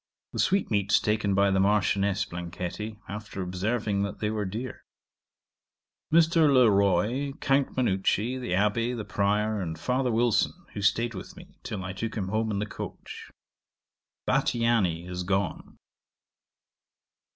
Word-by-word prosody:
The - - -4
sweetmeats 100 - +2
taken 105 -2 0
by 100 0 +4
the 95 - +2
Marchioness 100 0 +2
Blanchetti, 90 +5 -5
after 105 -2 -6
observing 100 +3 -1
that 100 0 -3
they 105 0 -1
were 105 -1 -2
dear. 115 +7 -5 1.3
Mr. 165 -2 +5
Le 125 -5 +6
Roy, 105 +8 +2
Count 135 -1 0
Manucci, 115 +2 +1
the 125 - -3
Abbé, 115 +5 +1
the 105 - -5
Prior, 105 +1 0
and 80 -3 -4
Father 125 0 0
Wilson, 115 -2 +2 0.2
who 105 - -5
staid 115 +4 +2
with 95 - -9
me, - - -15
till 100 -4 -5
I 95 +1 -5
took 110 +3 -4
him 95 -4 -2
home 110 +2 0
in 105 - -1
the 105 - -1
coach. 105 - -8 1.0
'Bathiani 105 -8 +1
is 90 0 -4
gone. 95 0 -2
105 Hz, 140 wpm, -27 LUFS, 95-115 Hz, 1.3 s, Le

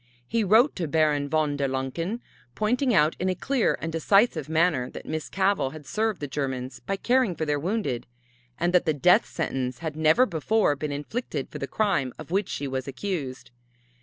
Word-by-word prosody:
He 230 -1 +1
wrote 220 +8 +4
to 170 -4 -2
Baron 150 -2 +2
Von 150 -2 +1
der 140 -1 0
Lancken, 135 - -3 0.3
pointing 245 - +1
out 155 -6 +4
in 185 - 0
a 185 - 0
clear 265 +1 +1
and 165 - -4
decisive 165 - +2
manner 160 -6 +2
that - - -9
Miss 155 -1 -4
Cavell 190 -8 +1
had 155 -2 -10
served 215 +5 -1
the 145 - -3
Germans 130 -2 -4
by 195 - -3
caring 245 -2 +2
for 160 - -2
their 145 -1 0
wounded, 165 - -2 0.5
and 175 +1 +1
that 180 0 +4
the 155 - +2
death 180 - +4
sentence 130 -6 -3
had 160 -3 -5
never 160 +10 +4
before 195 - +1
been 145 +1 -4
inflicted 150 - -4
for - - -6
the 140 - -3
crime 140 - 0
of - - -10
which 195 +1 0
she 140 - -3
was 130 0 -3
accused. 135 -4 -4
160 Hz, 190 wpm, -26 LUFS, 140-200 Hz, 0.5 s, wrote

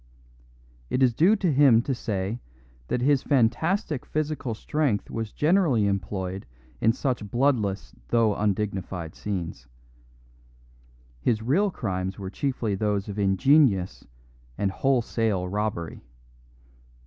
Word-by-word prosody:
It 130 - +1
is 125 -2 +4
due 175 - +4
to 185 -7 0
him 130 -5 +5
to 135 - -1
say 105 -2 -3 0.5
that 125 - -1
his 140 0 +3
fantastic 145 - +1
physical 150 -6 -3
strength 140 -4 -1
was 110 -2 -4
generally 150 - +2
employed 95 -2 -3 0.3
in 115 - +4
such 125 -4 -2
bloodless 120 -5 0
though 115 -3 +3
undignified 95 -5 -2
scenes; 90 -5 -5 1.5
his 110 - 0
real 175 - +2
crimes 95 - -3
were 95 -2 -6
chiefly 125 -3 -2
those 105 0 -1
of 100 +1 -5
ingenious 100 - +3 0.5
and 100 -1 0
wholesale 115 -6 0
robbery. 100 -4 -3
110 Hz, 110 wpm, -26 LUFS, 100-135 Hz, 1.5 s, him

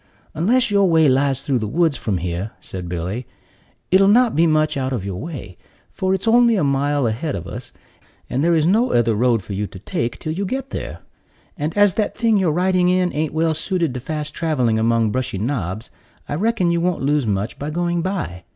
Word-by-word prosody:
"Unless 225 +9 +2
your 200 -2 +4
way 160 -2 +4
lies 135 0 +2
through 135 -4 0
the 110 - -3
woods 160 +5 +1
from 105 -6 -2
here," 90 +4 -4
said 90 -2 -7
Billy, 90 +8 -4 0.6
"it'll 195 +1 +5
not 235 +3 +4
be 165 +2 +4
much 155 -1 +2
out 130 -1 -2
of 115 -7 -3
your 95 -2 -4
way; 135 - -8 0.3
for 190 0 0
it's 190 +4 -4
only 235 0 +5
a 190 - +1
mile 140 0 +1
ahead 120 +7 -2
of 85 - -6
us, 85 - -8 0.6
and 135 +4 -1
there 170 0 +3
is 155 -1 +2
no 220 +8 +2
other 115 -1 +3
road 115 -1 +2
for 100 - -7
you 100 +2 -2
to - - -11
take 115 +5 -3
till 155 - -4
you 190 +5 -3
get 265 +7 -4
there; - - -6 0.5
and 155 +6 -4
as 205 -2 +5
that 210 -2 -2
thing 225 -2 +3
you're 185 -5 +2
riding 180 +2 +2
in 180 -1 +1
ain't 155 0 -1
well 160 +1 +1
suited 170 -2 -1
to 125 - -4
fast 150 +3 -4
traveling 125 -9 0
among 115 -1 +2
brushy 125 -5 -2
knobs, 105 -2 -3 0.4
I - - -4
reckon 190 +1 +1
you 170 0 +1
won't 175 -4 -1
lose 145 -3 +1
much 100 +1 -2
by 145 - -4
going 175 +2 -1
by. 165 - -4
150 Hz, 215 wpm, -20 LUFS, 115-180 Hz, 0.6 s, it'll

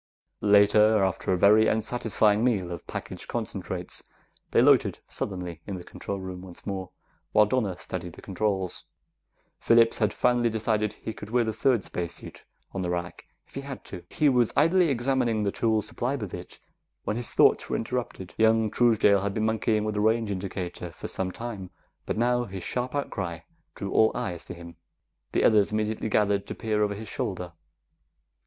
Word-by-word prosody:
Later, 105 +1 +5
after 95 0 0
a 90 - +2
very 105 +4 +6
unsatisfactory 110 -2 +1
meal 105 -8 +1
of 85 -2 -7
packaged - - -6
concentrates, - - -4 0.5
they - - +3
loitered - - +5
sullenly 90 -4 -5
in 100 - -3
the 90 - -9
control 100 +2 -6
room 95 -1 -7
once 90 -2 -11
more 95 -2 -4 0.4
while 105 0 +6
Donna 105 -5 0
studied 90 -2 -6
the - - -13
controls. 95 -1 -2 0.7
Phillips 115 0 +4
had 105 -2 +2
finally 120 +1 +2
decided 110 -1 0
that 105 - -16
he 110 - -3
could 105 - -9
wear 120 +1 +2
the 110 -1 -2
third 120 -2 +2
spacesuit 85 -1 -6 0.3
on 95 - -3
the 90 - -2
rack 85 0 -4 0.2
if - - -24
he 140 - -4
had 140 -2 -8
to. 90 - -8
He 150 - +2
was 125 -4 +3
idly 175 +1 +4
examining 120 -4 +1
the 100 - 0
tools 110 -1 +1
supplied 125 +4 -2
with 100 -4 -5
it - - -8 0.4
when 105 - -2
his 120 0 -2
thoughts - - +4
were - - 0
interrupted. 115 -6 -4
Young 110 -1 +4
Truesdale 110 -4 +4
had 100 0 -2
been 110 - 0
monkeying 110 -1 +1
with 110 0 -2
a 105 - +1
range 110 0 +2
indicator 90 -2 -4
for 85 - -8
some 95 -1 -2
time, 105 -4 -6 0.4
but - - -2
now 120 +1 +2
his 95 -4 -7
sharp 125 +2 -3
outcry 95 -11 -3 0.3
drew 100 -1 -5
all 110 - +4
eyes 90 -9 -4
to - - -7
him. 85 -1 -11 0.6
The - - +2
others 105 -2 +4
immediately 110 +1 -1
gathered 105 -1 +2
to - - -5
peer 110 -1 -1
over 105 -1 +1
his 110 +2 -8
shoulder. 90 -3 -4
105 Hz, 180 wpm, -27 LUFS, 95-115 Hz, 0.7 s, very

